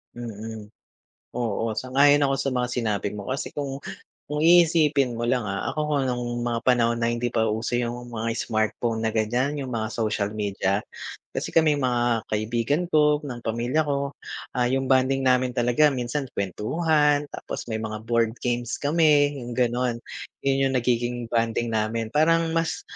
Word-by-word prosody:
Mm. 110 -2 -7 0.7
Oo, 115 -2 -1
sang-ayon 140 +5 +4
ako 135 0 +2
sa 135 - -1
mga 125 -1 0
sinabi 110 -5 -1
mo 100 - -6
kasi 140 - -3
kung 140 -1 -4 0.5
kung 150 +1 -2
iisipin 155 -6 +4
mo 115 - -4
lang, 120 -2 0
ah, 100 0 -2
ako 155 +3 -3
kung 145 -2 +1
nung 120 -1 -3
mga 120 -1 -1
panahon 120 -2 +3
na 115 0 +1
hindi 120 0 -1
pa 110 -2 +1
uso 110 +3 -1
yung 120 0 -4
mga 115 0 -2
smartphone 110 +1 -1
na 110 - -1
ganiyan, 120 +6 0
yung 130 - -6
mga 110 -2 -2
social 105 -2 -1
media, 100 -1 -1 0.5
kasi - - -4
kaming 155 -3 +4
mga 120 -3 0
kaibigan 115 +8 0
ko, 150 -1 +3
ng 125 -4 -6
pamilya 120 +7 0
ko, 140 -1 -1 0.5
ah, 125 - +3
yung 135 +1 0
bonding 130 +1 +3
namin 125 -1 +2
talaga 125 +5 +4
minsan 130 +3 -2
kuwentuhan 150 - +1
tapos - - -6
may 110 - -1
mga 110 -1 -5
board 115 -1 +1
games 120 -1 -1
kami, 145 -2 +3
yung 120 -1 -6
gano'n. 125 -1 +1 0.5
'Yon 135 0 +2
yung 135 - -3
nagiging 120 -1 -1
bonding 115 0 0
namin, 110 +1 -1
parang 165 +2 +3
mas, 165 0 -1
120 Hz, 165 wpm, -25 LUFS, 115-140 Hz, 0.7 s, sang-ayon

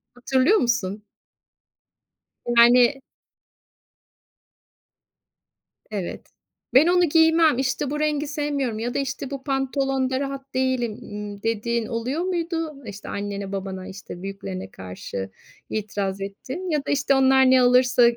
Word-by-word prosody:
Hatırlıyor 260 - +3
musun? 215 -4 -1 1.5
Yani 245 +3 +6 2.9
Evet. 195 -5 -5 0.5
"Ben 280 +6 +7
onu 355 0 +4
giymem, 320 -2 +5
işte, 265 +1 -1
bu 295 - -2
rengi 300 -1 0
sevmiyorum 285 -6 -2
ya 240 +2 -2
da, - - 0
işte, 275 0 -4
bu 275 -1 -5
pantolonda 270 -1 0
rahat 275 -1 -5
değilim." 255 -3 0
ımm, 205 -1 -7
dediğin 230 +1 -1
oluyor 250 +6 -2
muydu? 330 -6 -3
İşte, 205 -1 -8
annene, 200 -1 -4
babana, 190 -1 -5
işte, 190 -2 -9
büyüklerine 195 -1 -6
karşı 95 +1 -7 0.4
itiraz 200 -2 -3
ettin 260 - -6
ya 300 -4 0
da, - - -1
işte, 280 -1 +2
onlar 265 -1 +5
ne 260 -1 +6
alırsa 250 0 +5
255 Hz, 120 wpm, -24 LUFS, 210-280 Hz, 2.9 s, Ben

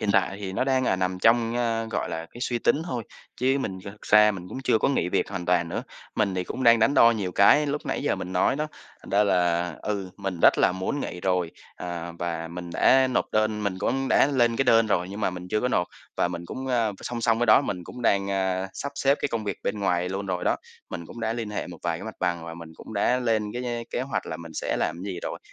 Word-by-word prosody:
hiện 105 - 0
tại 95 0 +2
thì 95 -2 -4
nó 115 - 0
đang, 130 -1 +2
à, 95 - +2
nằm 90 0 -1
trong, 115 +2 +3
a, 115 -2 0
gọi 90 - -2
là, 80 0 -4
cái 120 - -12
suy 120 -1 -1
tính 145 +6 +2
thôi, 120 -7 -3 0.3
chứ 135 +2 +2
mình 95 -8 -3
thực 100 +1 -10
ra 105 0 +6
mình 90 -3 -7
cũng 130 - -6
chưa 110 - +3
có - - +2
nghỉ 110 -10 +1
việc - - 0
hoàn 90 -3 -4
toàn 90 -1 +2
nữa. - - -3 0.3
Mình 100 -3 +1
thì 90 - -1
cũng 130 - -5
đang 115 0 +7
đắn 140 +6 +3
đo 115 - +7
nhiều 100 -6 -2
cái 145 - +5
lúc 145 +1 -3
nãy - - -2
giờ - - +1
mình 90 - -6
nói 90 +8 +2
đó, 150 - -1 0.4
thành - - -11
ra 100 +2 +4
là, 90 -3 +1
ừ, 100 -3 -3
mình 95 -4 -4
rất - - +6
là - - +4
muốn 95 +10 -2
nghỉ 90 - -5
rồi, 90 -3 0 0.3
ờ, 85 -1 -5
và 85 -1 -3
mình 85 0 -7
đã 130 +7 +5
nộp 125 - +1
đơn 110 0 +1
mình 95 -2 -2
cũng 135 +6 0
đã - - +5
lên 120 -5 +2
cái 135 - +2
đơn 115 -1 +5
rồi 90 -4 +1
nhưng 100 +2 -6
mà 95 - +1
mình 90 0 -8
chưa 105 - +1
có 125 - +1
nộp. 90 -8 +1 0.3
Và - - +2
mình 85 -1 -5
cũng, 130 +8 -6
ơ, 115 -5 +1
song 120 -1 -4
song 115 0 +2
với 120 - +1
đó 110 - +7
mình 90 -9 -4
cũng 125 - -9
đang, 100 -3 +2
a, 95 0 0
sắp 140 - -5
xếp 140 +1 +2
cái - - 0
công 115 -2 -3
việc 100 - -2
bên 105 0 -2
ngoài 90 -2 +1
luôn 100 +1 -4
rồi 90 -2 -2
đó. - - +2 0.3
Mình 85 - -6
cũng 120 - -10
đã 110 0 0
liên 115 -2 -4
hệ 105 - -3
một - - -10
vài - - -1
cái - - -8
mặt - - -6
bằng, 85 -1 -1
và 85 0 -7
mình 85 -1 -10
cũng - - -11
đã 125 +5 +2
lên 110 -3 0
cái 125 +1 -4
nh 120 -1 -3
kế - - -2
hoạch 135 +2 -3
là - - -4
mình 85 -1 -10
sẽ - - -1
làm 85 +3 -2
gì 95 -3 -4
rồi, - - -4
100 Hz, 275 wpm, -26 LUFS, 90-120 Hz, 0.4 s, đang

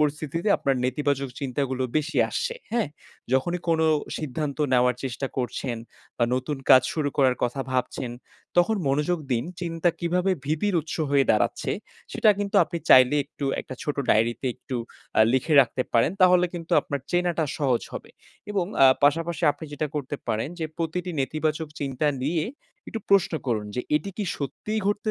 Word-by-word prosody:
পরিস্থিতিতে 150 +5 -1
আপনার 135 -1 0
নেতিবাচক 140 +1 0
চিন্তাগুলো 130 -1 -2
বেশি 155 +1 -1
আসছে? 480 0 -2 0.2
হ্যাঁ, 235 -9 +1 0.4
যখনই 175 +7 +1
কোনো 160 -1 +3 0.3
সিদ্ধান্ত 150 0 -3
নেওয়ার 125 0 +4
চেষ্টা 135 +1 -3
করছেন 125 -1 -2 0.4
বা 120 - +4
নতুন 130 +3 -2
কাজ 130 -1 +9
শুরু 150 -3 0
করার 130 -3 +4
কথা 125 +3 0
ভাবছেন 125 0 -2 0.5
তখন 195 +5 +4
মনোযোগ 150 +5 +1
দিন। 120 0 0 0.2
চিন্তা 165 0 0
কিভাবে 180 +2 +1
ভীতির 160 +7 0
উৎস 155 - -6
হয়ে 140 -1 +4
দাঁড়াচ্ছে? 105 - +1 0.4
সেটা 215 - +4
কিন্তু 205 0 -1
আপনি 170 - -5
চাইলে 130 +2 +8
একটু 140 0 -7 0.2
একটা 130 - -8
ছোট 150 - -2
ডায়েরিতে 115 +4 +2
একটু 130 - -6 0.4
আ - - +7
লিখে 130 +5 +1
রাখতে 130 0 +1
পারেন, 115 +6 +4
তাহলে 180 -1 +6
কিন্তু 165 -1 -6
আপনার 140 -2 -4
চেনাটা 175 -2 +1
সহজ 130 -5 +1
হবে - - -7 0.4
এবং 195 -4 0 0.2
আ - - +10 0.2
পাশাপাশি 165 +4 +1
আপনি 160 - -10
যেটা 150 +1 -2
করতে 145 -1 -3
পারেন 110 +5 0
যে, 160 - -2
প্রতিটি 175 +2 -2
নেতিবাচক 155 +3 -1
চিন্তা 140 +1 -1 0.2
নিয়ে 155 +3 0 0.4
একটু 225 - -4
প্রশ্ন 200 -3 +4
করুন 110 -4 -1
যে, - - +1 0.2
এটি 175 +7 -3
কি 210 - -2
সত্যিই 210 - -3
ঘটতে 205 +1 0
150 Hz, 165 wpm, -25 LUFS, 130-170 Hz, 0.5 s, আ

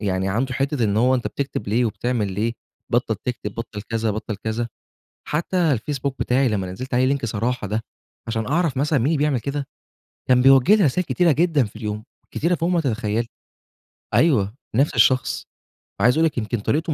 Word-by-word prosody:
يعني 95 -2 -1
عنده 125 +6 -1
حتّة 135 -2 0
إن 105 -1 +1
هو 125 +3 +4
أنت 125 - -1
بتكتب 140 -7 -4
ليه، 115 +4 +2
وبتعمل 115 -3 -1
ليه؟ 110 +4 -1 0.4
بطّل - - +1
تكتب، - - -5
بطّل 105 - -6
كذا، 115 0 -1
بطّل 110 +1 -4
كذا، 110 +3 -3 0.6
حتّى 165 +5 -1 0.2
الفيسبوك 135 +2 -2
بتاعي 130 +1 +2
لمّا 95 -4 -2
نزِّلت 125 +6 -5
عليه 130 +3 +3
Link 135 - -6
صراحة 115 +1 -2
ده، 105 +3 -2 0.5
عشان 110 -1 -2
أعرف 160 0 +1
مثلًا 145 +2 +2
مين 120 - +1
اللي 160 +2 +2
بيعمل 145 -4 +1
كده، 140 +2 -3 0.6
كان 125 -1 +5
بيوجه 135 +8 +6
لي 210 - +3
رسايل 175 +6 +1
كتيرة 175 +1 +2
جدًا 160 -2 +3
في 105 - -12
اليوم، 105 -1 -4 0.3
كتيرة 170 +3 +1
فوق 170 +1 -1
ما 175 -2 +2
تتخيّلي، 115 -4 -1 0.9
أيوه 115 -11 +3 0.2
نفْس 140 +5 +2
الشخص، 130 0 +2 0.5
عايز 125 +3 +5
أقول 160 - +3
لِك 155 - -1
يمكن 115 0 -1
طريقته 155 +9 0
125 Hz, 185 wpm, -22 LUFS, 110-145 Hz, 0.9 s, بيوجه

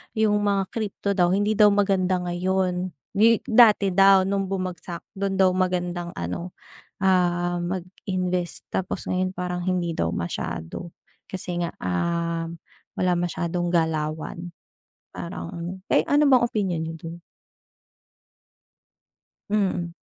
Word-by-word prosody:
yung 215 -1 +3
mga 200 -1 +2
crypto 210 -2 -3
daw, 180 -3 +3
hindi 205 +2 0
daw 210 - +9
maganda 190 -3 +2
ngayon, 180 +1 0 0.2
'di 220 +2 +4
dati 215 -4 +5
daw, 195 +1 +6
nung 195 0 -1
bumagsak. 180 -2 -4
Dun 195 0 -2
daw 190 -1 +4
magandang 180 -1 -1
ano, 90 - -5 0.4
ah, 175 -2 +2
mag 175 0 -3 0.2
invest 180 -1 -2
tapos 185 - -2
ngayon 185 0 0
parang 180 -1 -4
hindi 175 -2 -1
daw 85 - 0
masyado, 85 - -4 0.4
kasi 180 -2 -2
nga, 170 - -1
um, 170 - -2 0.4
wala 185 -1 +2
masyadong 175 0 -1
galawan. 160 +1 -1 0.6
Parang 170 0 -6 0.2
eh, - - +6
ano 295 +1 +4
bang 260 -3 +6
opinyon 190 -7 -1
niyo 160 0 -4
dun? 165 +1 -9 2.3
Mm. 185 -5 0
180 Hz, 120 wpm, -24 LUFS, 170-195 Hz, 2.3 s, daw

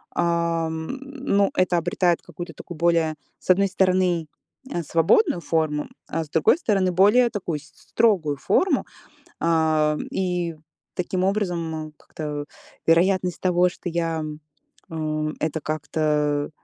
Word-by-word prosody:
ам, 165 -1 0
ну 275 -8 0
это 185 -1 +2
обретает 170 +1 +1
какую-то 175 0 -8
такую 175 - -9
более, 165 -1 +2 0.2
с - - -18
одной 195 +2 +5
стороны, 185 -3 +1 0.4
э, 170 - -2
свободную 170 - +3
форму, 150 -1 -1 0.2
а 165 +1 -2
с 150 - -14
другой 160 - +4
стороны, 200 - +1
более 210 +7 +5
такую 180 -8 -3
с - - -16
с 145 -1 -22
строгую 180 -11 +2
форму. 340 - +2 0.5
А, 155 -2 +2
и 180 -3 -1 0.4
таким 180 +1 -1
образом, 195 -3 0 0.2
м, 155 -1 -6
как-то 150 -2 -6 0.4
вероятность 180 +1 +3
того, 180 -1 +3
что 175 - -6
я, 165 -1 -1
м, 155 -1 -5 0.9
э, - - -10
это 160 0 -2
как-то, 150 -1 0
170 Hz, 135 wpm, -24 LUFS, 155-185 Hz, 0.9 s, одной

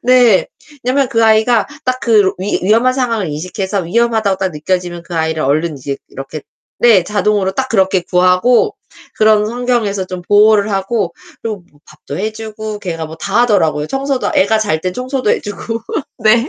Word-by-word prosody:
네. 245 -5 +4 0.4
왜냐면 260 +1 +1
그 230 -1 +2
아이가 220 0 +3 0.2
딱 255 0 -1
그 210 -5 +3
위 195 +3 -1
위험한 225 +6 +3
상황을 235 -6 -1
인식해서 190 +6 -3
위험하다고 220 +2 +1
딱 190 - 0
느껴지면 175 +2 -3
그 170 +1 -9
아이를 160 -1 -1
얼른 155 +3 0
이제 140 +1 -4
이렇게 135 +2 -8 0.4
네. 225 -6 +5
자동으로 205 -1 0
딱 260 +6 -2
그렇게 190 -4 +2
구하고 185 - +3 0.4
그런 215 0 +4
환경에서 235 -5 -1
좀 185 -1 -6
보호를 205 +2 +4
하고 195 +3 -1 0.3
그리고 215 -5 -4
뭐 145 - -26
밥도 150 -1 -9
해 215 +3 -2
주고 215 -1 -6
걔가 165 -5 -5
뭐 160 +1 -10
다 200 +7 0
하더라고요. 165 -10 +1
청소도 270 - -2
애가 220 +3 +3
잘 180 -8 0
때는 180 +1 -3
청소도 255 -2 -1
해 - - +1
주고. 220 +3 -5 0.4
네. 230 +4 +3
205 Hz, 360 characters per minute, -15 LUFS, 180-230 Hz, 0.4 s, 네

